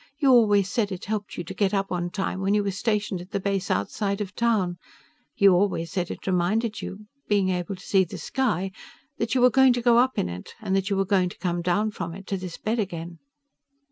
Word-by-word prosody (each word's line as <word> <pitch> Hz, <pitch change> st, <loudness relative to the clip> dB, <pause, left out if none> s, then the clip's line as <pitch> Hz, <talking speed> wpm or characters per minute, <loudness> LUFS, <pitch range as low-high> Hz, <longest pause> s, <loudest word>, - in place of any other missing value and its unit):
You 280 Hz, -3 st, +4 dB
always 205 Hz, -5 st, +5 dB
said 205 Hz, 0 st, -1 dB
it 185 Hz, -, -5 dB
helped 210 Hz, 0 st, -4 dB
you 175 Hz, -, -3 dB
to 175 Hz, -, -7 dB
get 200 Hz, +1 st, +1 dB
up 195 Hz, 0 st, -1 dB
on 175 Hz, -1 st, -1 dB
time 190 Hz, 0 st, -3 dB
when 195 Hz, +2 st, +2 dB
you 210 Hz, -, +2 dB
were 200 Hz, -, -1 dB
stationed 205 Hz, -2 st, -1 dB
at 180 Hz, -, -11 dB
the 200 Hz, -1 st, -2 dB
base 195 Hz, -1 st, -1 dB
outside 200 Hz, -, -1 dB
of 205 Hz, -1 st, -4 dB
town. 205 Hz, -7 st, +1 dB, 0.6 s
You 200 Hz, -2 st, +6 dB
always 175 Hz, -3 st, +1 dB
said 180 Hz, -3 st, -2 dB
it -, -, -7 dB
reminded 205 Hz, +5 st, 0 dB
you 210 Hz, +2 st, -7 dB, 0.2 s
being 200 Hz, -2 st, +2 dB
able 180 Hz, +1 st, -2 dB
to 185 Hz, -, -14 dB
see 195 Hz, -1 st, +4 dB
the 175 Hz, -, -7 dB
sky 210 Hz, -8 st, -1 dB, 0.5 s
that 230 Hz, +3 st, -1 dB
you 255 Hz, -, +3 dB
were 250 Hz, 0 st, +6 dB
going 265 Hz, 0 st, +6 dB
to 245 Hz, -, -1 dB
go 235 Hz, -1 st, +5 dB
up 260 Hz, +1 st, +2 dB
in -, -, +1 dB
it, 90 Hz, +1 st, -8 dB
and 200 Hz, -4 st, -1 dB
that 195 Hz, 0 st, 0 dB
you 200 Hz, -, 0 dB
were 195 Hz, -, +2 dB
going 185 Hz, -2 st, +2 dB
to -, -, -12 dB
come 175 Hz, -1 st, -1 dB
down 205 Hz, +5 st, +1 dB
from 170 Hz, -4 st, -5 dB
it 195 Hz, 0 st, -10 dB
to 195 Hz, -, -1 dB
this 180 Hz, -2 st, -7 dB
bed 225 Hz, +2 st, -1 dB
again." 170 Hz, -4 st, -4 dB
195 Hz, 240 wpm, -25 LUFS, 180-215 Hz, 0.6 s, You